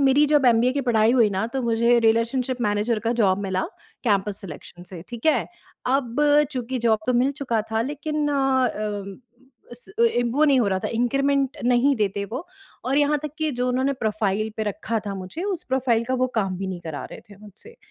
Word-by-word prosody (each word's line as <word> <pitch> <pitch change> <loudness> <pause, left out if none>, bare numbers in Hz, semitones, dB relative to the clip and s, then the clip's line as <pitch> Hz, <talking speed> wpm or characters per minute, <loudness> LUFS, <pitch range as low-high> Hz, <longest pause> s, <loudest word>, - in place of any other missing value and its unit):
मेरी 275 +2 +4
जब 295 -2 +3
एमबीए 240 +1 +4
की 280 - -1
पढ़ाई 230 -2 +3
हुई 235 -4 +4
ना 195 +3 -1
तो 270 - -1
मुझे 235 +1 +3
रिलेशनशिप 235 +3 +1
मैनेजर 210 +2 0
का 230 - +2
जॉब 190 -2 +3
मिला 190 -1 -1 0.4
कैंपस 205 -2 +1
सिलेक्शन 175 -1 -10
से, 180 -2 -9
ठीक 240 +4 -6
है। 310 - +3 0.4
अब 250 -2 0 0.4
चूँकि 255 -1 -3
जॉब 225 -2 +2
तो 250 - +2
मिल 255 +3 +2
चुका 245 -6 -1
था 220 0 +1
लेकिन 295 +3 -2
अ, 270 -2 +2 1.0
उस 240 0 -10
ए - - +6
ए, 245 - 0
वो 255 +6 +2
नहीं 280 -3 +4
हो 230 - +2
रहा 190 -1 0
था - - -1
इंक्रीमेंट 275 +3 +1
नहीं 250 +3 +3
देते 200 -2 -1
वो। 255 - -6 0.4
और 270 +3 +1
यहाँ 295 +1 +2
तक 300 -2 -5
की 310 -1 0
जो 250 0 -1
उन्होंने 260 +2 +1
प्रोफाइल 215 -2 -1
पे 220 - 0
रखा 215 +2 -2
था 200 - -3
मुझे 190 - -6
उस 390 -5 -3
प्रोफाइल 250 -3 +1
का 255 +2 -1
वो - - -1
काम 195 -4 0
भी 195 - -3
नहीं 185 -2 -5
करा 160 -4 -6
रहे - - -9
थे 205 - -13
मुझसे। 215 - -15
240 Hz, 210 wpm, -23 LUFS, 215-270 Hz, 1.0 s, ए